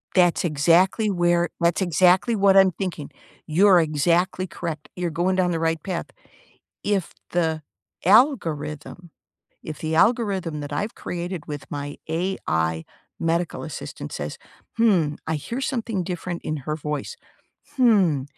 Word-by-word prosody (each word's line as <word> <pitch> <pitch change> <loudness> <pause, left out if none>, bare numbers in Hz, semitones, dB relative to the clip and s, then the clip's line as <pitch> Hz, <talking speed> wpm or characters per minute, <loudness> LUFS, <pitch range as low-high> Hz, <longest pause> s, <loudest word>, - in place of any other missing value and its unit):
That's 175 -1 +4
exactly 175 +8 +3
where 175 -2 +2
that's 170 +2 +2
exactly 185 +5 +3
what 195 -1 +4
I'm 190 -1 +6
thinking. 175 -6 -5 0.4
You're 180 +3 +5
exactly 170 +4 +1
correct, 165 -3 -6
you're 180 -1 -2
going 175 +4 0
down 180 -1 +2
the 165 - -1
right 165 -1 0
path. 180 -3 -3 0.8
If 200 -4 -1 0.2
the 160 -3 0 0.4
algorithm 175 - +1 0.5
if 155 - -7
the 160 0 -2
algorithm 190 -7 +1
that 145 0 -7
I've 205 +9 -3
created 175 -1 -5
with 145 -3 -6
my 145 0 -5
AI 80 - -1 0.3
medical 165 +1 -1
assistant - - -7
says, - - -5 0.4
"Hmm, 180 -10 +3
I 160 - 0
hear 230 - -5
something 230 -7 -2
different 175 0 -5
in 155 - -2
her 150 +3 -4
voice. 150 - -4 0.6
Hmm, 195 - +3
175 Hz, 135 wpm, -23 LUFS, 155-190 Hz, 0.8 s, I'm